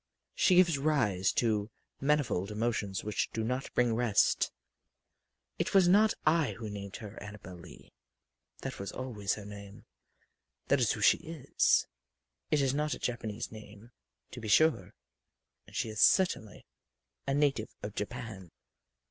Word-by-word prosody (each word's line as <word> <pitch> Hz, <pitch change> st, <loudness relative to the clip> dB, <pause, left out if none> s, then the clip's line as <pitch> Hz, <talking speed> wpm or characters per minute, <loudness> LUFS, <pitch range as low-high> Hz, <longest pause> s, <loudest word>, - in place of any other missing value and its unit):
She 185 Hz, -, +3 dB
gives 170 Hz, -5 st, +5 dB
rise 110 Hz, -11 st, +1 dB
to 110 Hz, -3 st, +1 dB, 0.3 s
manifold 135 Hz, -10 st, +1 dB
emotions 105 Hz, -3 st, -2 dB
which 105 Hz, 0 st, -1 dB
do 110 Hz, -, -2 dB
not 125 Hz, +4 st, -3 dB
bring 120 Hz, -2 st, +3 dB
rest. 115 Hz, -3 st, +2 dB, 1.1 s
It -, -, -1 dB
was 190 Hz, -2 st, +6 dB
not 210 Hz, +4 st, +5 dB
I 155 Hz, -2 st, +3 dB
who 110 Hz, -2 st, -7 dB
named 100 Hz, -1 st, -7 dB
her 105 Hz, 0 st, -9 dB
Annabel 100 Hz, -2 st, -9 dB
Lee. -, -, -14 dB, 0.7 s
That -, -, -6 dB
was 100 Hz, -, -5 dB
always 115 Hz, -7 st, -3 dB
her 105 Hz, -, -9 dB
name 100 Hz, -1 st, -11 dB, 0.8 s
that -, -, +4 dB
is -, -, +2 dB
who -, -, -6 dB
she -, -, +5 dB
is. 160 Hz, -4 st, +1 dB, 0.6 s
It 150 Hz, -, +2 dB
is 135 Hz, -1 st, +1 dB
not 150 Hz, +1 st, 0 dB
a -, -, -12 dB
Japanese 115 Hz, -2 st, -4 dB
name, 110 Hz, +1 st, -12 dB, 0.4 s
to -, -, -8 dB
be 110 Hz, -, -6 dB
sure 110 Hz, -, +3 dB, 0.7 s
and -, -, -15 dB
she 125 Hz, -, -1 dB
is 110 Hz, 0 st, -3 dB
certainly 175 Hz, -, +3 dB, 0.6 s
a 135 Hz, -, +1 dB
native 140 Hz, -6 st, +1 dB
of 105 Hz, -, -5 dB
Japan. 105 Hz, -4 st, -6 dB
115 Hz, 150 wpm, -31 LUFS, 105-140 Hz, 1.1 s, was